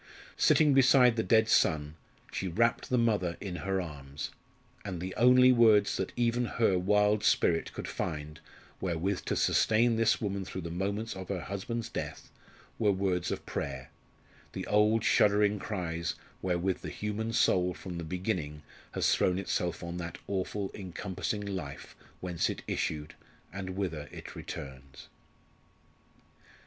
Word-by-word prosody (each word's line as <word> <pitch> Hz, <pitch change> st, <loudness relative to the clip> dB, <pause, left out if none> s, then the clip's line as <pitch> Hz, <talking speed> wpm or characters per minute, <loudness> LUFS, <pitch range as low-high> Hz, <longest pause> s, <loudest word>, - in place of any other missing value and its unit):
Sitting 150 Hz, -3 st, +5 dB
beside 130 Hz, -2 st, +6 dB
the 110 Hz, -, +1 dB
dead 110 Hz, 0 st, +4 dB
son, 75 Hz, -7 st, +2 dB, 0.4 s
she 95 Hz, -, -3 dB
wrapt 115 Hz, +7 st, +1 dB
the 125 Hz, -, +2 dB
mother 105 Hz, -7 st, +1 dB
in 95 Hz, -3 st, -5 dB
her 95 Hz, +3 st, -1 dB
arms, 70 Hz, -4 st, -6 dB, 0.5 s
and 95 Hz, -4 st, -5 dB
the 90 Hz, +2 st, -4 dB
only 125 Hz, +2 st, +6 dB
words 110 Hz, -4 st, +5 dB
that 95 Hz, -, -2 dB
even 120 Hz, 0 st, +1 dB
her 115 Hz, -4 st, +2 dB
wild 105 Hz, +2 st, +3 dB
spirit 85 Hz, -6 st, +2 dB
could -, -, -6 dB
find 75 Hz, -2 st, -4 dB, 0.4 s
wherewith 90 Hz, +2 st, -1 dB
to -, -, -1 dB
sustain 115 Hz, +1 st, +3 dB
this 115 Hz, -1 st, +3 dB
woman 100 Hz, -2 st, -2 dB
through 95 Hz, 0 st, -6 dB
the 85 Hz, -1 st, -6 dB
moments 100 Hz, +5 st, -2 dB
of 95 Hz, -1 st, -8 dB
her 95 Hz, -3 st, -2 dB
husband's 105 Hz, +6 st, -4 dB
death -, -, -6 dB, 0.5 s
were 105 Hz, -2 st, +4 dB
words 95 Hz, -2 st, 0 dB
of -, -, -4 dB
prayer 65 Hz, -2 st, -5 dB, 0.6 s
the -, -, -4 dB
old 105 Hz, +1 st, +3 dB
shuddering 105 Hz, -1 st, +4 dB
cries 85 Hz, -4 st, -3 dB, 0.3 s
wherewith 90 Hz, 0 st, 0 dB
the -, -, -5 dB
human 105 Hz, +2 st, -3 dB
soul 90 Hz, -5 st, +3 dB
from 90 Hz, -1 st, -7 dB
the -, -, -4 dB
beginning 80 Hz, -4 st, -3 dB, 0.3 s
has -, -, +2 dB
thrown 90 Hz, 0 st, +2 dB
itself 90 Hz, -3 st, -2 dB
on 85 Hz, 0 st, -5 dB
that 85 Hz, -1 st, -5 dB
awful 100 Hz, 0 st, -2 dB
encompassing 95 Hz, +2 st, -4 dB
Life 90 Hz, -9 st, -6 dB, 0.3 s
whence 90 Hz, -2 st, -1 dB
it -, -, -5 dB
issued, 75 Hz, -1 st, -2 dB, 0.4 s
and 95 Hz, -2 st, -5 dB
whither 80 Hz, -7 st, -3 dB
it -, -, -9 dB
returns. 65 Hz, 0 st, -9 dB
95 Hz, 145 wpm, -30 LUFS, 85-110 Hz, 0.6 s, beside